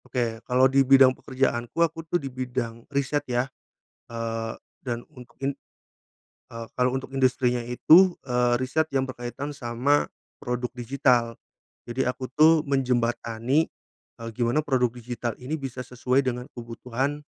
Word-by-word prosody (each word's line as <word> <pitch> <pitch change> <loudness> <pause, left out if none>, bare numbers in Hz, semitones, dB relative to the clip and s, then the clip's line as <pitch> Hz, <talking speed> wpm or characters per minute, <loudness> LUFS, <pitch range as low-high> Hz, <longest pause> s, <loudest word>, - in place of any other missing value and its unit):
Oke, 115 -3 -2
kalau 125 +1 +5
di 135 +1 +4
bidang 135 -1 +7
pekerjaanku, 130 -2 -2
aku 165 0 -6
tuh 175 - +2
di 145 - -8
bidang 125 -2 -4
riset 140 +1 0
ya. 125 0 +1 0.6
Eee, 115 -1 -4 0.2
dan 120 -2 -4
un 125 -4 -11 0.2
in 140 - +1 1.0
eee, 115 0 -7
kalau 125 +1 +1
untuk 135 0 -6
industrinya 130 -2 +2
itu, 160 +10 +5
eee, 125 -2 +2
riset 130 +6 0
yang 135 -1 +2
berkaitan 130 +3 -5
sama 135 +2 +1 0.3
produk 125 0 -3
digital. 120 -1 +1 0.5
Jadi 125 +2 -1
aku 130 0 -4
tuh 155 +2 +5
menjembatani, 125 0 +1 0.5
eee, 115 - -5
gimana 120 +6 0
produk 130 -4 +2
digital 120 0 -5
ini 145 +5 -5
bisa 130 -2 -5
sesuai 125 +2 0
dengan 125 -1 -3
kebutuhan, 125 +4 -3
125 Hz, 140 wpm, -26 LUFS, 120-135 Hz, 1.0 s, bidang